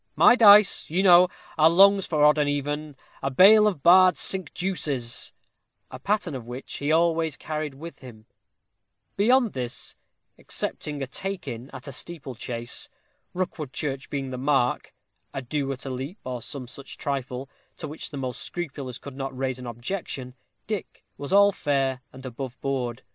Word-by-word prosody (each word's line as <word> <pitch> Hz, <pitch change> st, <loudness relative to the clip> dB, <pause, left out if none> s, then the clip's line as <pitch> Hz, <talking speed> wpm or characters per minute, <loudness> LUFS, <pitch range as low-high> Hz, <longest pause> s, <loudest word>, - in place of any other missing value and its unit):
My 245 Hz, -, +7 dB
dice, 210 Hz, -5 st, +7 dB
you 180 Hz, +5 st, +1 dB
know, 180 Hz, -1 st, +7 dB, 0.3 s
are 155 Hz, +1 st, +7 dB
longs 195 Hz, +3 st, +5 dB
for 150 Hz, -3 st, +3 dB
odd 150 Hz, +1 st, +5 dB
and 145 Hz, -1 st, +2 dB
even, 145 Hz, +1 st, -3 dB, 0.3 s
a 135 Hz, -, -1 dB
bale 210 Hz, +9 st, +7 dB
of 175 Hz, -10 st, -2 dB
bar'd 185 Hz, 0 st, +7 dB
cinque 190 Hz, -5 st, 0 dB
deuces," 145 Hz, -10 st, -2 dB, 0.6 s
a 130 Hz, -, -8 dB
pattern 200 Hz, +1 st, -1 dB
of 125 Hz, -3 st, -7 dB
which 125 Hz, +2 st, -7 dB
he 145 Hz, +2 st, -1 dB
always 165 Hz, -2 st, +2 dB
carried 155 Hz, -2 st, -4 dB
with 165 Hz, +4 st, -10 dB
him; 115 Hz, -4 st, -13 dB, 0.9 s
beyond 240 Hz, +2 st, +3 dB
this, 125 Hz, -2 st, -3 dB, 0.4 s
excepting 145 Hz, -2 st, -4 dB
a -, -, -1 dB
take 195 Hz, +8 st, -5 dB
in 120 Hz, +3 st, -6 dB
at 130 Hz, 0 st, -10 dB
a -, -, -5 dB
steeple 140 Hz, 0 st, -6 dB
chase, 120 Hz, 0 st, -5 dB, 0.5 s
Rookwood 160 Hz, -6 st, -4 dB
church 135 Hz, -3 st, -4 dB
being 135 Hz, -2 st, -4 dB
the 125 Hz, -, -5 dB
mark, 135 Hz, -2 st, +1 dB, 0.4 s
a 135 Hz, -, -2 dB
"do" 140 Hz, +1 st, -2 dB
at 135 Hz, 0 st, -7 dB
a 135 Hz, -, -4 dB
leap, 135 Hz, -, -5 dB
or 125 Hz, -2 st, -5 dB
some 130 Hz, +1 st, -7 dB
such 135 Hz, +3 st, -11 dB
trifle, 135 Hz, -2 st, -4 dB, 0.3 s
to -, -, -6 dB
which 150 Hz, +2 st, -6 dB
the 145 Hz, -, -7 dB
most 130 Hz, -2 st, -4 dB
scrupulous 140 Hz, -7 st, -5 dB
could 140 Hz, -2 st, -10 dB
not 135 Hz, -1 st, -5 dB
raise 130 Hz, -1 st, -2 dB
an 125 Hz, -, -8 dB
objection, 125 Hz, -, -5 dB, 0.3 s
Dick 210 Hz, -4 st, -6 dB
was 145 Hz, -, -7 dB
all 200 Hz, +1 st, +6 dB
fair 135 Hz, -6 st, -1 dB
and 130 Hz, +1 st, -12 dB
above 130 Hz, 0 st, -7 dB
board. 130 Hz, -3 st, -3 dB
140 Hz, 170 wpm, -25 LUFS, 130-175 Hz, 0.9 s, My